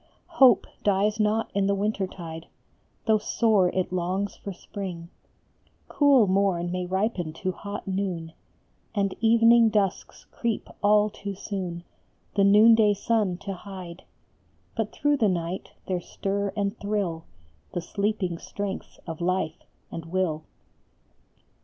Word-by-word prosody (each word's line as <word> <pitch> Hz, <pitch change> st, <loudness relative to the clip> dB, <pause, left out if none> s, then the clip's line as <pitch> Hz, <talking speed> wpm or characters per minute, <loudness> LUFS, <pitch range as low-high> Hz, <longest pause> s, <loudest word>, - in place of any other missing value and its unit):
Hope 250 Hz, -5 st, +7 dB, 0.2 s
dies 205 Hz, +2 st, +2 dB
not 215 Hz, +1 st, +1 dB
in 195 Hz, -1 st, +1 dB
the 200 Hz, -, +2 dB
winter 200 Hz, -1 st, -1 dB
tide, 165 Hz, -3 st, -8 dB, 0.6 s
Though 220 Hz, -1 st, +4 dB
sore 210 Hz, -4 st, +3 dB
it 185 Hz, 0 st, -2 dB
longs 185 Hz, +3 st, -1 dB
for 200 Hz, -, -7 dB
spring; 180 Hz, -2 st, -7 dB, 0.8 s
Cool 280 Hz, -6 st, +5 dB
morn 185 Hz, -3 st, +1 dB
may 180 Hz, 0 st, -2 dB
ripen 190 Hz, -4 st, -1 dB
to 185 Hz, +3 st, -2 dB
hot 200 Hz, +3 st, -7 dB
noon, 185 Hz, -4 st, -2 dB, 0.6 s
And 200 Hz, -2 st, +1 dB
evening 230 Hz, 0 st, +6 dB
dusks 200 Hz, -3 st, -1 dB
creep 230 Hz, -3 st, -2 dB
all 210 Hz, 0 st, +4 dB
too 200 Hz, 0 st, -6 dB
soon 185 Hz, -4 st, -5 dB, 0.5 s
The 200 Hz, -, +4 dB
noonday 210 Hz, +1 st, +6 dB
sun 205 Hz, -3 st, 0 dB
to 200 Hz, -, -2 dB
hide; 185 Hz, -2 st, -9 dB, 0.7 s
But 220 Hz, -2 st, -2 dB
through 290 Hz, 0 st, +1 dB
the 220 Hz, -5 st, +3 dB
night 175 Hz, 0 st, -3 dB, 0.2 s
there 180 Hz, -2 st, -1 dB
stir 200 Hz, +2 st, -2 dB
and 200 Hz, +1 st, 0 dB
thrill 200 Hz, -6 st, -2 dB, 0.5 s
The 175 Hz, -, -2 dB
sleeping 200 Hz, -2 st, -2 dB
strengths 200 Hz, -1 st, -5 dB
of 165 Hz, -1 st, -6 dB
life 180 Hz, -2 st, -1 dB, 0.3 s
and 165 Hz, -, -6 dB
will. 165 Hz, -3 st, -1 dB
195 Hz, 130 wpm, -26 LUFS, 180-210 Hz, 0.8 s, Hope